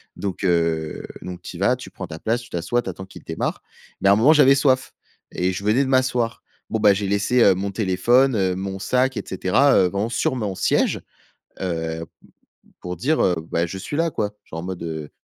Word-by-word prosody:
donc 100 Hz, 0 st, -4 dB
heu, 80 Hz, -3 st, 0 dB, 0.2 s
donc 90 Hz, -1 st, -7 dB
tu -, -, -8 dB
y -, -, -10 dB
vas, -, -, +3 dB
tu -, -, -10 dB
prends -, -, -7 dB
ta 80 Hz, -, -8 dB
place, 115 Hz, +6 st, 0 dB
tu 120 Hz, -, -14 dB
t'assois, 90 Hz, +8 st, -1 dB
tu 95 Hz, -, -6 dB
attends 95 Hz, +1 st, -7 dB
qu'il 95 Hz, -, -14 dB
démarre, -, -, -3 dB, 0.4 s
mais -, -, +2 dB
à -, -, +7 dB
un -, -, +5 dB
moment, 115 Hz, +8 st, +5 dB
j'avais 140 Hz, -3 st, +6 dB
soif 130 Hz, -1 st, +2 dB, 0.4 s
et 90 Hz, +1 st, 0 dB
je 95 Hz, -, -5 dB
venais 115 Hz, +6 st, +3 dB
de 130 Hz, -, -3 dB
m'asseoir. 125 Hz, -3 st, +1 dB, 0.3 s
Bon, 110 Hz, -, -1 dB
ben, 105 Hz, -1 st, +6 dB
j'ai 100 Hz, +1 st, -2 dB
laissé, 105 Hz, +5 st, +2 dB
heu, 100 Hz, -, +6 dB
mon 100 Hz, +2 st, -3 dB
téléphone, 115 Hz, +7 st, +3 dB
heu, 95 Hz, -2 st, +1 dB
mon 95 Hz, +1 st, -4 dB
sac 125 Hz, +5 st, +1 dB
et -, -, -2 dB
cetera, 95 Hz, +10 st, +3 dB
heu, 90 Hz, -, +5 dB
vraiment 100 Hz, +4 st, -1 dB
sur 120 Hz, +2 st, 0 dB
mon 105 Hz, -5 st, -3 dB
siège, -, -, +1 dB, 0.6 s
heu, 80 Hz, -2 st, -3 dB, 0.7 s
pour 90 Hz, 0 st, -5 dB
dire, 150 Hz, -, +1 dB
heu: 90 Hz, -, +3 dB, 0.2 s
«Bah, 85 Hz, +1 st, +1 dB
je 85 Hz, -, -7 dB
suis 145 Hz, +9 st, -5 dB
là, 165 Hz, 0 st, +2 dB
quoi». 105 Hz, -6 st, -2 dB
Genre, 80 Hz, -, -7 dB
en -, -, -8 dB
mode, 90 Hz, -2 st, -5 dB
heu: 80 Hz, -3 st, -5 dB
100 Hz, 225 wpm, -22 LUFS, 90-120 Hz, 0.7 s, à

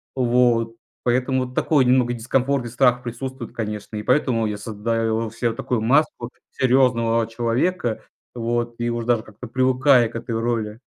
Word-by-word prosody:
Вот. 120 Hz, -2 st, +2 dB, 0.3 s
Поэтому 130 Hz, +1 st, +1 dB
такой 140 Hz, 0 st, +2 dB
немного 125 Hz, -1 st, +3 dB
дискомфорт 130 Hz, +2 st, 0 dB
и -, -, -4 dB
страх 125 Hz, +1 st, +2 dB
присутствует, 125 Hz, +1 st, -6 dB
конечно. 105 Hz, -1 st, -5 dB
И 105 Hz, -, -4 dB
поэтому 125 Hz, -2 st, +1 dB
я 105 Hz, -1 st, -2 dB
создаю 110 Hz, +1 st, -2 dB
се 115 Hz, 0 st, -1 dB
такую 120 Hz, +1 st, -2 dB
маску 125 Hz, -1 st, +1 dB, 0.2 s
серьёзного 120 Hz, -3 st, +2 dB
человека. 120 Hz, +4 st, -1 dB, 0.3 s
Вот. 120 Hz, 0 st, -2 dB
И 120 Hz, 0 st, -1 dB
уж 120 Hz, -1 st, -3 dB
даже 120 Hz, -2 st, +1 dB
как-то 110 Hz, +2 st, -11 dB
привыкаю 130 Hz, 0 st, +3 dB
к -, -, -14 dB
этой 115 Hz, -1 st, -3 dB
роли. 115 Hz, -2 st, -2 dB
120 Hz, 150 wpm, -22 LUFS, 115-125 Hz, 0.3 s, немного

